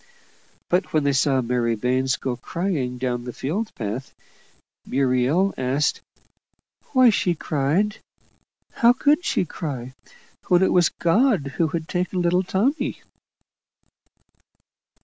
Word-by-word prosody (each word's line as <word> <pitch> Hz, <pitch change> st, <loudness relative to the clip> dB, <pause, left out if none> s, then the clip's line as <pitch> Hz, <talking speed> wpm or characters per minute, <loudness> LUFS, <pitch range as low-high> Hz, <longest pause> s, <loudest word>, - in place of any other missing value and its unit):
But 180 Hz, +1 st, 0 dB
when 155 Hz, -2 st, +2 dB
they 140 Hz, 0 st, +2 dB
saw 135 Hz, 0 st, +2 dB
Mary 120 Hz, -1 st, 0 dB
Baines 130 Hz, +3 st, 0 dB
go 130 Hz, -1 st, -3 dB
crying 140 Hz, -2 st, -3 dB
down 125 Hz, -1 st, -2 dB
the 125 Hz, -, -5 dB
field 195 Hz, -, -3 dB
path, 115 Hz, +3 st, -5 dB, 0.7 s
Muriel 135 Hz, +8 st, +1 dB
asked 130 Hz, +3 st, 0 dB, 0.9 s
"why 255 Hz, -3 st, +6 dB
she 180 Hz, -4 st, 0 dB
cried? 155 Hz, +9 st, 0 dB, 0.7 s
how 235 Hz, +1 st, +4 dB
could 295 Hz, +6 st, +2 dB
she 185 Hz, -, 0 dB
cry, 130 Hz, -6 st, -6 dB, 0.5 s
when 180 Hz, +1 st, +4 dB
it -, -, +2 dB
was 175 Hz, -2 st, +4 dB
God 180 Hz, -, +1 dB
who 165 Hz, -, +2 dB
had 160 Hz, 0 st, -4 dB
taken 180 Hz, +1 st, -2 dB
little 175 Hz, +1 st, +2 dB
Tommy?" 210 Hz, -, -1 dB
155 Hz, 120 wpm, -23 LUFS, 130-190 Hz, 0.9 s, why